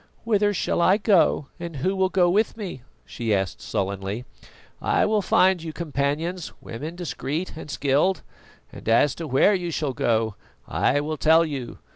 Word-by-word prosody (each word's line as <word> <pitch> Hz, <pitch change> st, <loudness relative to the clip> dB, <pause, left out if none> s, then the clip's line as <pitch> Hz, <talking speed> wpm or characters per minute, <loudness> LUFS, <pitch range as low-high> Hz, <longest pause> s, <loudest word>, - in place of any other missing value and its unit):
"Whither 210 Hz, -2 st, +2 dB
shall 185 Hz, -, 0 dB
I 185 Hz, +3 st, +5 dB
go 175 Hz, -9 st, +3 dB
and 170 Hz, -2 st, -6 dB
who 185 Hz, +8 st, -1 dB
will 190 Hz, -1 st, +2 dB
go 185 Hz, -2 st, +3 dB
with 210 Hz, +5 st, +1 dB
me?" 190 Hz, -, -6 dB, 0.2 s
she 115 Hz, -4 st, -1 dB
asked 95 Hz, -2 st, -2 dB
sullenly. 100 Hz, +4 st, -3 dB, 0.6 s
"I -, -, +2 dB
will 215 Hz, -1 st, +2 dB
find 185 Hz, -1 st, +3 dB
you 160 Hz, -1 st, -5 dB
companions, 160 Hz, +3 st, -2 dB
women 150 Hz, +9 st, -7 dB
discreet 170 Hz, -1 st, -4 dB
and 155 Hz, -, -9 dB
skilled. 145 Hz, +6 st, +1 dB, 0.5 s
And -, -, -7 dB
as 120 Hz, +5 st, +4 dB
to 165 Hz, -, -6 dB
where 135 Hz, +10 st, +4 dB
you 180 Hz, -3 st, -1 dB
shall 150 Hz, -4 st, -2 dB
go, 110 Hz, -2 st, +1 dB, 0.3 s
I 145 Hz, +2 st, +1 dB
will 155 Hz, +1 st, -3 dB
tell 160 Hz, +4 st, +5 dB
you. 135 Hz, -6 st, -5 dB
160 Hz, 165 wpm, -24 LUFS, 135-185 Hz, 0.6 s, I